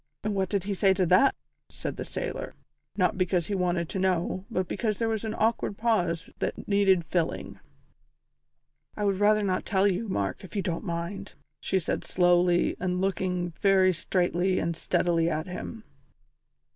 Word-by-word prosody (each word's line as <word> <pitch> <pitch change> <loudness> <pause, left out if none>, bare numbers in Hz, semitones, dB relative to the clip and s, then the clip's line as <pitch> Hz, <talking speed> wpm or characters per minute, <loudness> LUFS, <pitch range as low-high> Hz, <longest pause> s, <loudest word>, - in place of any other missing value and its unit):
"And 215 -1 -1
what 190 -2 0
did 200 -3 0
he 200 +1 -2
say 190 0 +3
to 185 -1 +2
that?" 185 +11 +5 0.3
said - - -5
the - - -5
sailor, - - -5 0.4
not 185 0 +1
because 180 -2 +1
he 205 - -3
wanted 175 -3 0
to 190 - -3
know, 185 0 0
but 185 -5 -1
because 215 -3 -1
there 230 - 0
was 220 -1 -1
an 220 0 -3
awkward 220 -2 0
pause 180 -8 0
that - - -3
needed 195 -4 +3
filling. 170 0 -2 1.4
"I 210 - -2
would 195 -1 +1
rather 210 +1 +4
not 185 -2 0
tell 195 -1 +2
you, 200 +4 -1
Mark, 100 - -2
if 190 - -11
you 200 - 0
don't 170 -1 -2
mind," 170 +3 -4 0.2
she 190 - 0
said 175 - -2
slowly 175 -1 +3
and 180 0 -1
looking 180 -2 -1
very 190 -2 +5
straightly 180 +2 0
and 170 0 -1
steadily 170 -1 +1
at 155 0 -2
him. 220 +5 -7
185 Hz, 170 wpm, -27 LUFS, 175-200 Hz, 1.4 s, that